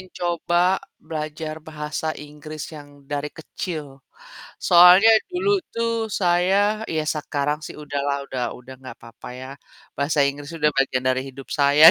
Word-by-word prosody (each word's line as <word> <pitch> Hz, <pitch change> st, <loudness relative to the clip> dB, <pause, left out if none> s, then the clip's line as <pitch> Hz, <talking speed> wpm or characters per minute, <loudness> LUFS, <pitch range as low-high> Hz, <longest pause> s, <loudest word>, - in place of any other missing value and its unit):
pingin 185 Hz, -, -12 dB
coba 175 Hz, +2 st, +1 dB, 0.2 s
belajar 155 Hz, 0 st, -5 dB
bahasa 155 Hz, 0 st, -4 dB
Inggris 150 Hz, +1 st, -8 dB
yang 145 Hz, -2 st, -12 dB
dari 145 Hz, +1 st, -3 dB
kecil. 155 Hz, -3 st, -7 dB, 0.6 s
Soalnya 180 Hz, +4 st, +8 dB, 0.2 s
dulu 385 Hz, +3 st, +1 dB, 0.2 s
tuh 230 Hz, -1 st, 0 dB
saya 200 Hz, +3 st, +2 dB
ya 160 Hz, -1 st, -1 dB
sekarang 150 Hz, -1 st, -1 dB
sih -, -, -9 dB
udahlah 140 Hz, -1 st, -2 dB
udah 125 Hz, -1 st, -4 dB, 0.2 s
udah 125 Hz, +1 st, -11 dB
nggak 130 Hz, -1 st, -10 dB
papa 115 Hz, 0 st, -11 dB
ya, 130 Hz, +1 st, -8 dB, 0.5 s
bahasa 145 Hz, +1 st, +2 dB
Inggris 145 Hz, +3 st, -2 dB
udah 150 Hz, -2 st, +2 dB
bagian 130 Hz, -1 st, +1 dB
dari 130 Hz, +1 st, -1 dB
hidup 135 Hz, 0 st, -11 dB
saya. 145 Hz, +3 st, +7 dB
150 Hz, 140 wpm, -23 LUFS, 140-175 Hz, 0.6 s, Soalnya